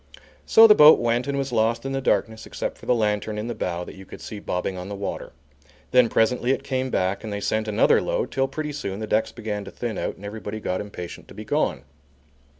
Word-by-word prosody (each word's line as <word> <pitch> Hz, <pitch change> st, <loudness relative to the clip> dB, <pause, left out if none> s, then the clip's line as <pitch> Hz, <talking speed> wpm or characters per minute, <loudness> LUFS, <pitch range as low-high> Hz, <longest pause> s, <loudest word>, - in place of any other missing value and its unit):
So 225 Hz, -, +8 dB
the 215 Hz, -, +9 dB
boat 150 Hz, -5 st, +8 dB
went 120 Hz, +2 st, 0 dB
and 140 Hz, 0 st, -1 dB
was 135 Hz, -1 st, -2 dB
lost 115 Hz, +2 st, +1 dB
in 135 Hz, -, -2 dB
the 135 Hz, 0 st, -2 dB
darkness 110 Hz, -3 st, 0 dB
except -, -, -5 dB
for -, -, -13 dB
the 125 Hz, -, +4 dB
lantern 105 Hz, -1 st, -1 dB
in 105 Hz, -, -3 dB
the 120 Hz, -, -3 dB
bow 90 Hz, -4 st, -3 dB
that -, -, -9 dB
you 95 Hz, -, -12 dB
could -, -, -11 dB
see 105 Hz, -, -7 dB
bobbing 90 Hz, -1 st, -3 dB
on 90 Hz, +1 st, -7 dB
the 100 Hz, -, -5 dB
water. 100 Hz, 0 st, -5 dB, 0.6 s
Then 125 Hz, -2 st, +5 dB
presently 120 Hz, +3 st, +1 dB
it 135 Hz, +1 st, +1 dB
came 130 Hz, -1 st, -2 dB
back 95 Hz, -4 st, -1 dB
and 110 Hz, -, -5 dB
they 100 Hz, -, -3 dB
sent 110 Hz, +2 st, -1 dB
another 105 Hz, -, +3 dB
load, -, -, -2 dB
till 135 Hz, +1 st, +1 dB
pretty 150 Hz, +2 st, -5 dB
soon 100 Hz, -8 st, -4 dB
the 110 Hz, -, -3 dB
decks 110 Hz, +1 st, 0 dB
began 105 Hz, -3 st, -5 dB
to -, -, -8 dB
thin 120 Hz, -4 st, -4 dB
out -, -, -3 dB
and 100 Hz, -, -12 dB
everybody 105 Hz, 0 st, -6 dB
got 90 Hz, -3 st, -2 dB
impatient 95 Hz, -4 st, -8 dB
to -, -, -14 dB
be -, -, -8 dB
gone. 70 Hz, -, 0 dB
110 Hz, 245 wpm, -24 LUFS, 100-125 Hz, 0.6 s, the